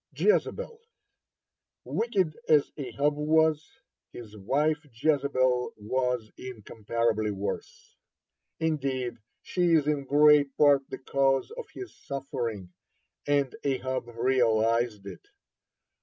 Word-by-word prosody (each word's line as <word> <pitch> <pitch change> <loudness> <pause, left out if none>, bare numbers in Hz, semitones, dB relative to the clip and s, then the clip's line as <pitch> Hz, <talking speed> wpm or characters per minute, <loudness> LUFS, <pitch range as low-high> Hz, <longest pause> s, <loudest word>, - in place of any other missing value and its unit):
(47) - - +5
JEZEBEL 475 -2 -8 1.1
Wicked 195 -9 0
as 150 -2 +4
Ahab 140 +1 -1
was, 155 - +2 0.4
his 110 -3 -11
wife 150 - 0
Jezebel 130 -1 +1
was 125 +1 -2
incomparably 115 -2 -2
worse. 100 -1 -6 0.6
Indeed, 135 -7 -2 0.2
she 175 -2 +1
is 150 -3 +3
in 145 -2 -1
great 145 0 +5
part 145 -2 +5
the - - -5
cause 135 - +1
of 485 +1 -8
his 380 - -8
suffering, 115 -9 -4 0.5
and 140 -2 +1
Ahab 130 -2 -2
realized 115 -3 +1
it. 250 - -10
135 Hz, 100 wpm, -28 LUFS, 115-150 Hz, 1.1 s, 47